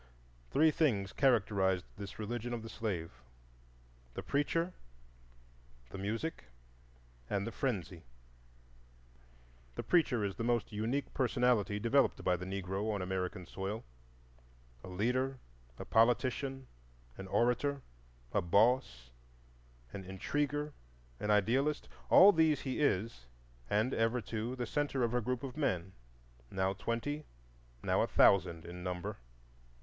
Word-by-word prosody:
Three 155 +2 +4
things 105 -12 +1
characterized 100 -8 +2
this 100 0 -8
religion 120 +2 -4
of 115 - -6
the 115 - -7
slave,—the - - -8
Preacher, 165 +5 0 1.2
the - - -6
Music, 110 - -3 0.8
and 100 0 0
the 115 - -4
Frenzy. 95 - -3 1.7
The - - -4
Preacher 140 -10 +2
is 100 - -4
the - - -2
most 120 -1 0
unique 115 +7 -2
personality 125 -5 +2
developed 120 +6 +2
by 90 - +3
the 90 +1 -6
Negro 95 +2 -2
on 100 -3 -2
American 90 -1 -3
soil. 95 +5 -4 1.0
A - - -8
leader, 125 +8 0 0.4
a - - -7
politician, 130 +3 +2 0.5
an 95 - -8
orator, 125 +6 +1 0.5
a - - +3
"boss," 85 - +2 0.8
an 95 - -6
intriguer, 145 +10 -2 0.5
an 105 - -3
idealist,—all 135 - +4
these 160 -5 +3
he 130 -2 -3
is, 105 - 0 0.4
and 110 +5 +1
ever, 115 +2 +1
too, 115 +3 -4
the 125 -1 -3
centre 140 0 -1
of 120 0 0
a 125 - +2
group 125 +2 -2
of 130 -2 -5
men, 95 - -1 0.6
now 95 0 0
twenty, 115 +9 -3 0.6
now - - +2
a - - +2
thousand 90 -4 +4
in 90 +1 -8
number. 90 -1 -4
110 Hz, 120 wpm, -34 LUFS, 95-130 Hz, 1.7 s, Three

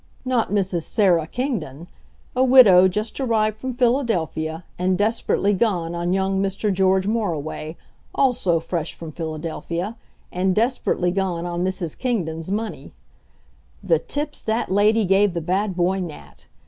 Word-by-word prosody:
Not 255 -3 +1
Mrs. 190 -4 0
Sarah 175 -4 +2
Kingdon, 175 - -4 0.5
a 255 - +3
widow 225 -9 +7
just 210 +7 -3
arrived 220 -5 +1
from 260 +4 -5
Philadelphia, 225 - 0 0.2
and 185 0 +1
desperately 205 -1 +1
gone 180 -5 0
on 175 +1 -2
young 190 0 +1
Mr. 195 +1 -1
George 190 0 +2
Moriway, 165 -7 -2 0.4
also 230 -11 +2
fresh 165 -1 -4
from 165 -2 -8
Philadelphia, 165 +5 -4 0.4
and 185 +1 0
desperately 220 -6 +1
gone 180 -3 -2
on 175 0 -2
Mrs. 185 -4 -3
Kingdon's 170 -10 -2
money. 215 +3 -4 0.9
The - - +2
tips 295 - -4
that 220 -2 -1
lady 210 +2 +3
gave 195 0 +3
the - - 0
bad 185 +4 -1
boy 185 +2 +1
Nat! 170 -5 -9
190 Hz, 135 wpm, -22 LUFS, 175-220 Hz, 0.9 s, widow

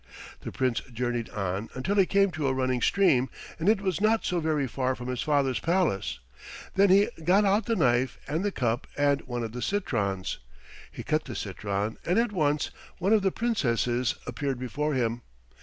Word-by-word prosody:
The - - -7
Prince 130 -2 0
journeyed 120 -1 -2
on 100 +1 -3
until 130 +11 -1
he 190 -2 +5
came 195 -1 +3
to 155 -3 -2
a 130 - +2
running 130 -1 0
stream, 135 -10 +3 0.3
and 165 +5 +2
it 215 -2 +3
was 190 -2 -1
not 220 +1 +2
so 180 - 0
very 155 -3 0
far 130 +1 -1
from 125 0 -7
his 125 -1 -2
father's 140 -4 +1
palace. 165 - 0 0.6
Then 200 +1 +4
he 200 +2 +5
got 190 +5 +4
out 200 +4 +2
the 230 - +1
knife 125 - +2
and 160 +6 -1
the 205 - 0
cup 120 -6 -1
and 145 -1 +2
one 120 -1 -3
of 115 - -4
the 125 +2 -6
citrons. 100 - -1 0.5
He - - -8
cut - - 0
the - - -6
citron, 100 +1 -3
and 180 +4 +1
at 230 -1 +2
once 150 -6 0 0.3
one 195 +5 +2
of 215 - +5
the 190 -1 +2
Princesses 125 - 0
appeared 135 +2 -2
before 145 +4 -2
him. 120 -1 0
140 Hz, 190 wpm, -27 LUFS, 120-190 Hz, 0.6 s, he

